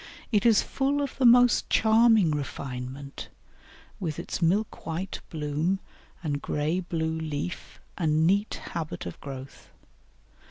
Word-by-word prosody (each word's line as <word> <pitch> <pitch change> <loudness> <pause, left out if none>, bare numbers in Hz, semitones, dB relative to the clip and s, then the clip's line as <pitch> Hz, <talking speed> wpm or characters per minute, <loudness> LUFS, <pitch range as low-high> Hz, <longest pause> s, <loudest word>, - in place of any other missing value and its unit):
It 215 0 +3
is 225 -3 +5
full 280 +1 0
of 280 - -4
the 255 - +6
most 245 0 +5
charming 220 -5 +5
refinement, 135 -1 -5 0.7
with 160 -6 -3
its - - -4
milk 195 +6 +1
white 170 +4 -3
bloom 155 +4 -1 0.4
and 145 -3 -2
grey 150 +4 -1
blue 160 -2 -2
leaf 155 +2 -5 0.2
and 155 -2 +2
neat 200 +4 +2 0.2
habit 165 -2 -4
of 85 - -7
growth. 135 -1 -9
165 Hz, 125 wpm, -27 LUFS, 145-210 Hz, 0.7 s, the